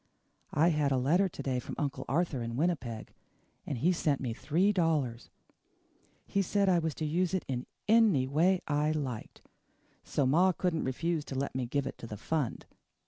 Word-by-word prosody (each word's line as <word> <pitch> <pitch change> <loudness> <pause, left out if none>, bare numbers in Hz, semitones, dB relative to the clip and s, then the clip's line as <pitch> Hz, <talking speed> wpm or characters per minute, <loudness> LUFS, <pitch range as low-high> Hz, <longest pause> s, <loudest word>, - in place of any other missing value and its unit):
I 165 +3 +5
had 150 -4 +1
a 135 - +3
letter 170 +10 +3
to - - -8
day 130 -2 0
from - - -7
Uncle 140 -2 -2
Arthur 155 -3 0
in 115 0 -4
Winnipeg, 135 -9 -2 0.5
and 135 - -2
he 165 +9 +3
sent 155 -5 +1
me 120 -4 -3
three 175 - +1
dollars. 150 - 0 1.0
He 200 - 0
said 200 +1 +1
I 180 -2 +4
was 160 -2 -2
to 155 - -3
use 175 +4 0
it 185 - -2 0.4
ANY 215 - +5
way 170 +7 +2
I 150 +1 +1
liked, 130 -7 -5 0.6
so 140 - 0
ma 175 +8 +4
couldn't 175 -2 -1
refuse 160 +5 -1
to 135 - -6
let 140 +1 -2
me 130 -2 -2
give 140 +2 -1
it 135 - -6
to 115 - -7
the 105 - -7
fund. 145 +2 -2
150 Hz, 185 wpm, -31 LUFS, 130-175 Hz, 1.0 s, I